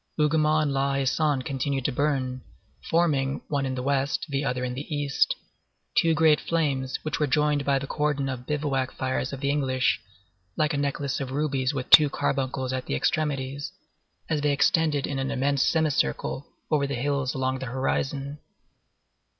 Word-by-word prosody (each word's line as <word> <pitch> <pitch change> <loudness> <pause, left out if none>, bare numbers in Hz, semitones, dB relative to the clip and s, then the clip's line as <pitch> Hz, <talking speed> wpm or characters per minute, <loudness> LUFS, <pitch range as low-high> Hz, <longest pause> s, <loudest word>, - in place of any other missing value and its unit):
Hougomont 155 0 +3
and 145 -2 0
La 135 0 +1
Haie 135 0 0
Sainte 140 -1 +1
continued 135 -1 -2
to - - +2
burn, 130 -2 -1 0.5
forming, 145 -5 +2
one 140 -2 0
in 130 - -2
the 125 - -3
west, 140 +1 0
the 140 0 -1
other 125 -2 -1
in 125 -1 -2
the 140 +5 -7
east, 145 -2 +1 0.6
two 165 -1 +4
great 155 -1 +4
flames 140 -5 -1
which 155 - -2
were 150 - +2
joined 150 -1 +2
by 140 -1 +3
the 135 - -3
cordon 145 -1 -1
of 125 -2 -5
bivouac 140 -3 -1
fires 130 0 -2
of 135 -1 -6
the 140 0 +1
English, 130 -4 +1 0.6
like 150 -1 +1
a - - 0
necklace 140 -1 -1
of 135 -2 -4
rubies 135 -1 -1
with 130 -2 -3
two 150 -2 +9
carbuncles 130 -2 -1
at 130 -1 -3
the - - -1
extremities, 140 - -1 0.6
as 150 -2 0
they 145 -1 +2
extended 150 0 +2
in 140 -2 -3
an 135 0 -1
immense 140 0 +1
semicircle 155 - 0 0.2
over 145 -2 +2
the 140 - -3
hills 135 0 -1
along 130 0 -1
the 130 - -5
horizon. 135 +3 -2
140 Hz, 175 wpm, -26 LUFS, 130-150 Hz, 0.6 s, two